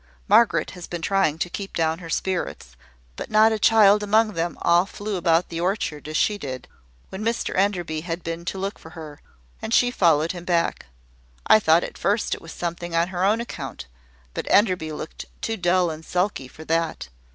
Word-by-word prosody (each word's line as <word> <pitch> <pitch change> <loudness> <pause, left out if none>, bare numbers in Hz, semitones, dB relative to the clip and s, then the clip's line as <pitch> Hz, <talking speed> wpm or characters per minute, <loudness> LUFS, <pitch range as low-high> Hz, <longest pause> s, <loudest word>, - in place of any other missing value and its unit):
"Margaret 170 -9 +4
has 180 -1 -9
been 170 -2 -6
trying 195 -5 +1
to 170 - -1
keep 195 +2 -7
down 160 0 0
her 170 -2 -9
spirits, 170 - -3 0.4
but - - -7
not 215 +1 +5
a 220 - -1
child 210 -1 +5
among 215 +1 +2
them 170 0 -2
all 175 +2 +4
flew 205 0 -5
about 170 -1 +2
the 165 0 -4
orchard 175 -6 -2
as 155 0 -2
she 210 -1 +1
did, 130 -5 -6 0.4
when 190 +3 -6
Mr 230 +1 -1
Enderby 175 -5 0
had 170 0 -5
been 165 +1 -5
to 195 - -3
look 195 +2 -4
for 160 - -12
her, 150 -2 -9 0.4
and 225 - 0
she 245 0 +4
followed 165 -7 +3
him 175 -2 -8
back. 170 -1 0 0.6
I 215 - +7
thought 165 -3 +4
at - - -7
first 205 +3 0
it - - -6
was 165 - -10
something 170 0 -4
on 170 +2 +2
her 185 -1 -2
own 210 +4 +3
account; 235 - -7 0.5
but - - -5
Enderby 185 -6 +3
looked 155 +1 -7
too 225 - -2
dull 180 -2 +2
and 155 +1 -8
sulky 180 -5 -1
for 155 +4 -13
that. 165 - -1
175 Hz, 195 wpm, -23 LUFS, 165-200 Hz, 0.6 s, I